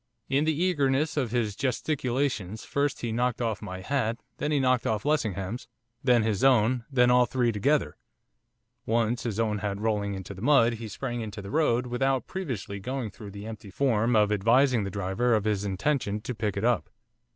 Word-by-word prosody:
In 140 Hz, +3 st, +2 dB
the 160 Hz, +2 st, +1 dB
eagerness 145 Hz, -4 st, +1 dB
of 135 Hz, -6 st, 0 dB
his 110 Hz, -3 st, -1 dB
gesticulations, 125 Hz, -, -1 dB
first 140 Hz, 0 st, -1 dB
he 115 Hz, -, -2 dB
knocked 120 Hz, +1 st, 0 dB
off 115 Hz, -3 st, -1 dB
my 95 Hz, -3 st, -6 dB
hat, 115 Hz, 0 st, -1 dB, 0.2 s
then 150 Hz, -, -2 dB
he 145 Hz, -, +2 dB
knocked 130 Hz, -2 st, +2 dB
off 110 Hz, +2 st, -1 dB
Lessingham's, 115 Hz, -, -1 dB, 0.4 s
then 125 Hz, -4 st, +4 dB
his 105 Hz, -1 st, 0 dB
own, 125 Hz, -2 st, +4 dB
then 125 Hz, -2 st, +4 dB
all 125 Hz, 0 st, +5 dB
three 120 Hz, -1 st, +1 dB
together, 105 Hz, -, +1 dB, 0.9 s
once, 115 Hz, +1 st, +1 dB
his 115 Hz, -3 st, -3 dB
own 105 Hz, -2 st, 0 dB
hat 100 Hz, -1 st, -2 dB
rolling 105 Hz, -2 st, -1 dB
into 95 Hz, +1 st, -7 dB
the 95 Hz, -, -11 dB
mud, 120 Hz, -3 st, +4 dB
he 115 Hz, -, -5 dB
sprang 120 Hz, +3 st, -4 dB
into 105 Hz, -1 st, -6 dB
the 100 Hz, -1 st, -7 dB
road, 130 Hz, -5 st, +2 dB
without 130 Hz, +2 st, 0 dB
previously 125 Hz, -, -5 dB
going 125 Hz, +1 st, -4 dB
through 105 Hz, +1 st, -10 dB
the 100 Hz, +1 st, -9 dB
empty 110 Hz, -2 st, -8 dB
form 115 Hz, +1 st, +1 dB
of 105 Hz, -1 st, +4 dB
advising 115 Hz, +3 st, +3 dB
the -, -, -3 dB
driver 100 Hz, +5 st, 0 dB
of 105 Hz, -, +1 dB
his 105 Hz, -2 st, 0 dB
intention, 105 Hz, +2 st, -1 dB
to 125 Hz, +3 st, -4 dB
pick 105 Hz, -3 st, -2 dB
it 100 Hz, -, -1 dB
up. 120 Hz, -2 st, +1 dB
115 Hz, 190 wpm, -27 LUFS, 105-130 Hz, 0.9 s, all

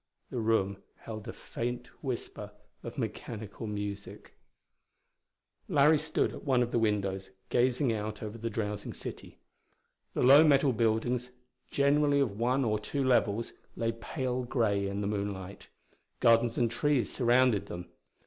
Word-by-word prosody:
The 125 Hz, -, -2 dB
room 110 Hz, -3 st, +1 dB, 0.2 s
held 110 Hz, -2 st, -7 dB
a -, -, -3 dB
faint 120 Hz, +1 st, -4 dB, 0.2 s
whisper 115 Hz, -5 st, -5 dB, 0.3 s
of 115 Hz, -, -8 dB
mechanical 110 Hz, -2 st, -5 dB
music. 100 Hz, -1 st, -6 dB, 1.3 s
Larry 150 Hz, +1 st, +5 dB
stood 155 Hz, +1 st, 0 dB
at -, -, -9 dB
one 130 Hz, -4 st, +3 dB
of 120 Hz, -, -4 dB
the 120 Hz, -, +2 dB
windows 100 Hz, -3 st, 0 dB, 0.2 s
gazing 125 Hz, 0 st, +2 dB
out 105 Hz, 0 st, -4 dB
over 110 Hz, +2 st, -6 dB
the 115 Hz, +1 st, -2 dB
drowsing 105 Hz, -2 st, -3 dB
city. -, -, -8 dB, 0.8 s
The -, -, +1 dB
low 140 Hz, +5 st, +9 dB
metal 140 Hz, -3 st, +4 dB
buildings, 115 Hz, +2 st, 0 dB, 0.4 s
generally 140 Hz, 0 st, +3 dB
of 110 Hz, -7 st, 0 dB
one 125 Hz, +3 st, +2 dB
or 105 Hz, -2 st, +1 dB
two 140 Hz, +6 st, -2 dB
levels, 115 Hz, -3 st, +2 dB, 0.2 s
lay 115 Hz, 0 st, 0 dB
pale 125 Hz, +2 st, -3 dB
grey 110 Hz, -6 st, 0 dB
in 100 Hz, +1 st, -3 dB
the -, -, -2 dB
moonlight. 100 Hz, -2 st, -4 dB, 0.5 s
Gardens 115 Hz, 0 st, +4 dB
and 120 Hz, -2 st, +2 dB
trees 135 Hz, -3 st, +1 dB
surrounded 120 Hz, -3 st, +3 dB
them. 90 Hz, 0 st, -7 dB
115 Hz, 140 wpm, -30 LUFS, 105-130 Hz, 1.3 s, low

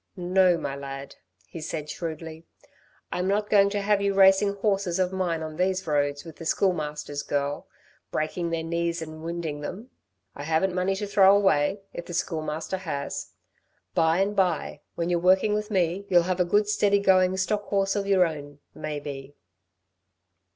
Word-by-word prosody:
"No, 180 Hz, 0 st, +3 dB
my 140 Hz, -4 st, -4 dB
lad," 140 Hz, 0 st, -8 dB, 0.3 s
he 165 Hz, -, -9 dB
said 155 Hz, -1 st, -4 dB
shrewdly. 160 Hz, 0 st, -6 dB, 0.6 s
"I'm 180 Hz, +1 st, -1 dB
not 205 Hz, +2 st, 0 dB
going 200 Hz, -1 st, +5 dB
to 205 Hz, 0 st, -2 dB
have 205 Hz, 0 st, +2 dB
you 200 Hz, -1 st, 0 dB
racing 195 Hz, +1 st, +5 dB
horses 195 Hz, -3 st, 0 dB
of 185 Hz, 0 st, 0 dB
mine 175 Hz, -4 st, -1 dB
on 155 Hz, -1 st, -7 dB
these 185 Hz, +1 st, 0 dB
roads 145 Hz, -2 st, 0 dB
with 165 Hz, -2 st, -11 dB
the -, -, -9 dB
Schoolmaster's 150 Hz, -6 st, -1 dB
girl 145 Hz, 0 st, -2 dB, 0.4 s
breaking 170 Hz, +2 st, -2 dB
their 165 Hz, -1 st, -2 dB
knees 170 Hz, 0 st, -2 dB
and 155 Hz, 0 st, -9 dB
windin' 165 Hz, -3 st, -4 dB
them. 210 Hz, -, -7 dB, 0.4 s
I -, -, -9 dB
haven't 165 Hz, +4 st, +1 dB
money 185 Hz, +1 st, 0 dB
to 205 Hz, +2 st, -3 dB
throw 200 Hz, 0 st, +5 dB
away, 195 Hz, -1 st, +2 dB
if 175 Hz, -, -7 dB
the 175 Hz, -, -5 dB
Schoolmaster 160 Hz, +2 st, -2 dB
has. 140 Hz, -6 st, -5 dB, 0.6 s
By 160 Hz, 0 st, +3 dB
and 205 Hz, +1 st, 0 dB
by, 175 Hz, -6 st, 0 dB
when 170 Hz, +1 st, -1 dB
you're 175 Hz, -, +2 dB
working 190 Hz, +4 st, +3 dB
with 210 Hz, +1 st, -2 dB
me, 190 Hz, 0 st, 0 dB
you'll 175 Hz, -2 st, +5 dB
have 185 Hz, +1 st, -2 dB
a 180 Hz, -, +3 dB
good 205 Hz, +4 st, +2 dB
steady 205 Hz, -1 st, +3 dB
going 185 Hz, -1 st, +3 dB
stock 205 Hz, +2 st, -1 dB
horse 195 Hz, -1 st, 0 dB
of 200 Hz, -1 st, -1 dB
y're 190 Hz, -2 st, +5 dB
own 145 Hz, -3 st, -6 dB, 0.2 s
maybe." 145 Hz, -2 st, -6 dB
175 Hz, 170 wpm, -26 LUFS, 155-195 Hz, 0.6 s, going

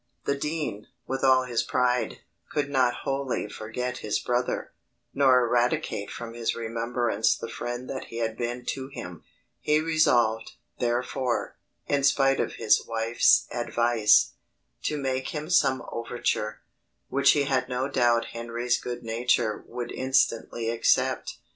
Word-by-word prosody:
The 140 Hz, -, +1 dB
dean, 150 Hz, -8 st, -3 dB, 0.2 s
with 135 Hz, +1 st, -3 dB
all 130 Hz, -1 st, +5 dB
his 120 Hz, -2 st, 0 dB
pride, 125 Hz, -1 st, 0 dB, 0.3 s
could 145 Hz, -1 st, -1 dB
not 125 Hz, -3 st, +2 dB
wholly 135 Hz, -4 st, -2 dB
forget 125 Hz, +4 st, -5 dB
his 105 Hz, -, -1 dB
brother, 125 Hz, 0 st, -1 dB, 0.4 s
nor 130 Hz, -3 st, +5 dB
eradicate 120 Hz, -2 st, 0 dB
from 115 Hz, -1 st, -7 dB
his 115 Hz, -1 st, -2 dB
remembrance 115 Hz, -1 st, 0 dB
the -, -, -6 dB
friend 120 Hz, +2 st, -5 dB
that 130 Hz, -, -5 dB
he 115 Hz, -, -9 dB
had 115 Hz, -1 st, -1 dB
been 120 Hz, +1 st, -4 dB
to 130 Hz, -1 st, -4 dB
him: 90 Hz, -, -9 dB, 0.4 s
he 150 Hz, 0 st, +2 dB
resolved, 120 Hz, -9 st, +2 dB, 0.3 s
therefore, 125 Hz, +1 st, -1 dB, 0.3 s
in 140 Hz, -1 st, 0 dB
spite 135 Hz, 0 st, +3 dB
of -, -, -1 dB
his 110 Hz, -2 st, +3 dB
wife's 115 Hz, +2 st, +3 dB
advice, 120 Hz, -2 st, +3 dB, 0.5 s
to 150 Hz, -, 0 dB
make 130 Hz, -2 st, -2 dB
him 155 Hz, +3 st, -4 dB
some 135 Hz, -7 st, +3 dB
overture, 115 Hz, -2 st, -2 dB, 0.5 s
which 140 Hz, +1 st, +4 dB
he 145 Hz, -, +2 dB
had 130 Hz, -2 st, 0 dB
no 125 Hz, +1 st, -1 dB
doubt 120 Hz, -4 st, +2 dB
Henry's 120 Hz, +1 st, -1 dB
good 120 Hz, 0 st, -5 dB
nature 115 Hz, -1 st, 0 dB
would 120 Hz, 0 st, -5 dB
instantly 120 Hz, -3 st, 0 dB
accept. 115 Hz, 0 st, +1 dB
125 Hz, 140 wpm, -26 LUFS, 115-135 Hz, 0.5 s, all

